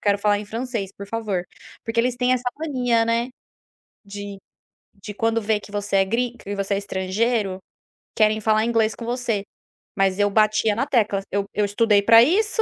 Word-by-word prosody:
"Quero 200 -1 +2
falar 205 0 +2
em 210 - -6
francês, 225 -2 -4
por 200 0 -9
favor", 210 -5 -2 0.4
porque 225 +1 -3
eles 245 +1 +2
têm 250 +1 +2
essa 250 0 0
mania, 250 -7 0
né, 230 +2 0 0.7
de 200 -1 -8 0.6
de 205 +1 -8
quando 225 +2 0
vê 215 -1 0
que 205 - -14
você 205 -1 -2
é 195 - +4
grin 235 +5 -1
que 205 -3 -7
você 200 0 -1
é - - 0
estrangeiro, 200 +1 -1 0.6
querem 215 0 +3
falar 215 0 +2
inglês 225 -2 +1
com - - -9
você, 235 -4 -2 0.5
mas 195 0 +1
eu 205 0 +3
batia 215 +1 +2
na 240 - 0
tecla, 215 -7 +1
eu 200 0 0
eu 210 - +1
estudei 205 0 +3
para 230 +2 +7
isso. 425 - +2
215 Hz, 185 wpm, -22 LUFS, 200-235 Hz, 0.7 s, para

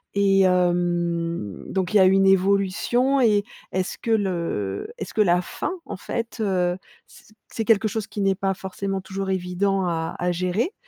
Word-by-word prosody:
Et 195 -1 +4
hem, 175 - 0
donc 190 0 -2
il - - +6
y - - +6
a 190 - +7
une 195 +1 +4
évolution 200 +8 +2
et 210 -3 +4 0.3
est 185 - 0
ce - - -7
que 230 - -3
le 170 - -1
est - - -4
ce - - -12
que 215 - +2
la 180 -2 +3
fin, - - -4
en - - -6
fait, 230 +4 -4
heu, 180 -3 +1 0.3
c'est 215 - -19 0.2
c'est 225 - -3
quelque 220 -1 +3
chose 215 0 -3
qui 205 - -5
n'est 195 -1 +2
pas 195 0 -1
forcément 195 +1 -4
toujours 190 +1 -5
évident 190 +1 0
à 165 -2 -2
à 180 0 0
gérer 185 - -1
190 Hz, 190 wpm, -23 LUFS, 180-200 Hz, 0.3 s, a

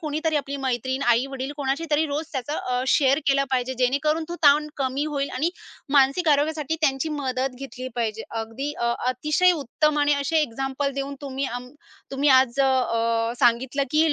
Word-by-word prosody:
कोणीतरी 310 0 -1
आपली 280 -1 -3
मैत्रीण, 260 0 -2
आई-वडील 260 +3 0
कोणाशीतरी 295 +3 0
रोज 300 +2 -3
त्याचं 275 +2 -3
अ, 250 0 -2
शेअर 275 +1 +3
केलं 275 0 +3
पाहिजे, 260 0 0
जेणेकरून 295 +5 +1
तो 345 - -4
ताण 295 +1 +5
कमी 270 +1 -1
होईल 285 -2 -2
आणि 305 +7 0 0.4
मानसिक 280 +5 +4
आरोग्यासाठी 300 +1 +1
त्यांची 280 0 +1
मदत 265 -3 -2
घेतली 260 -1 -7
पाहिजे. 225 -2 -2
अगदी 225 +6 -4
अ, 235 0 +1
अतिशय 305 +8 +2
उत्तम 300 0 0
आणि 290 0 +3
असे 280 +3 -1
एक्झाम्पल 270 +2 -2
देऊन 275 +1 -4
तुम्ही 275 -1 -4
आम्ह 245 0 -6 0.4
तुम्ही 275 +2 +1
आज 260 -1 +4
अ, - - +5
अ, 230 -3 +1
सांगितलं, 250 +4 +2
की 310 0 +3
275 Hz, 165 wpm, -24 LUFS, 255-295 Hz, 0.4 s, ताण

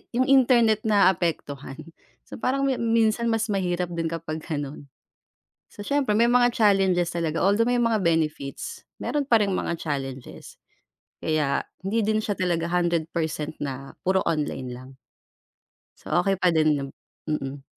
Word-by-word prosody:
'yong 255 +2 +3
internet 240 -5 +5
naaapektuhan. 170 -9 +1 0.5
So - - -10
parang 270 +4 0 0.2
minsan 230 0 +2
mas 225 -1 0
mahirap 180 -2 -1
din 165 -1 -2
kapag 160 -1 -4
ganun. 145 -3 -6 0.8
So 205 - -10
siyempre 275 -7 +1
may 235 - +5
mga 245 0 +4
challenges 195 -6 +2
talaga, 165 -2 -1
although 215 +4 +3
may 245 0 +2
mga 230 -3 +1
benefits, 155 -5 -2 0.2
meron 295 - -1
pa 230 - +6
ring 200 -2 0
mga 170 - -2
challenges. 135 -4 -6 0.7
Kaya, 155 -3 +1 0.2
hindi 210 +4 0
din 215 0 +1
siya 215 -1 -1
talaga 175 -3 0
100% 165 -3 -1
na 135 -1 -5
puro 190 0 +1
online 145 -5 -2
lang. 130 +1 -10 1.1
So - - -4
okey 195 -1 +1
pa 185 -2 +3
din 155 -2 +3
yung - - -11 0.4
mm. 140 -2 -3
180 Hz, 140 wpm, -25 LUFS, 155-220 Hz, 1.1 s, pa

